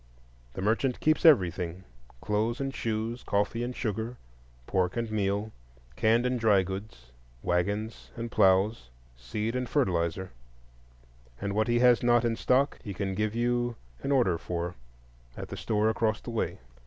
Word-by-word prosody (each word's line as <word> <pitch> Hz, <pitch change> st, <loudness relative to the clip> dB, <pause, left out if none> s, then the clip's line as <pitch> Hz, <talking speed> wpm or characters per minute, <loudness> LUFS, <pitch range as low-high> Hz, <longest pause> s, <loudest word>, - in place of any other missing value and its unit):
The 95 Hz, -, -5 dB
merchant 115 Hz, +5 st, +1 dB
keeps 155 Hz, +2 st, +3 dB
everything,—clothes 90 Hz, -, 0 dB
and 135 Hz, -1 st, -2 dB
shoes, 115 Hz, +1 st, -2 dB
coffee 105 Hz, +4 st, 0 dB
and 125 Hz, +1 st, -4 dB
sugar, 115 Hz, +1 st, -3 dB, 0.5 s
pork 90 Hz, -, 0 dB
and 115 Hz, -2 st, -2 dB
meal, 105 Hz, +1 st, -1 dB, 0.4 s
canned 115 Hz, +2 st, +3 dB
and 125 Hz, -1 st, 0 dB
dried 105 Hz, -4 st, +4 dB
goods, 95 Hz, -, -8 dB, 0.3 s
wagons 100 Hz, +5 st, -1 dB
and 115 Hz, 0 st, -5 dB
ploughs, 95 Hz, -, +3 dB, 0.3 s
seed 105 Hz, -, -3 dB
and 125 Hz, -1 st, -2 dB
fertilizer,—and -, -, -4 dB
what 110 Hz, +1 st, +1 dB
he 120 Hz, 0 st, +2 dB
has 125 Hz, -2 st, +6 dB
not 120 Hz, 0 st, +4 dB
in 115 Hz, -1 st, +1 dB
stock 135 Hz, +5 st, +2 dB
he 100 Hz, -5 st, -6 dB
can 95 Hz, +1 st, -2 dB
give 105 Hz, +2 st, -1 dB
you 120 Hz, 0 st, 0 dB, 0.3 s
an 140 Hz, -, -2 dB
order 115 Hz, -12 st, +3 dB
for 85 Hz, 0 st, -3 dB, 0.6 s
at -, -, -6 dB
the -, -, -5 dB
store 110 Hz, -1 st, 0 dB
across 110 Hz, -1 st, +1 dB
the 120 Hz, -, -7 dB
way. 115 Hz, -, -2 dB
105 Hz, 145 wpm, -29 LUFS, 90-120 Hz, 0.6 s, has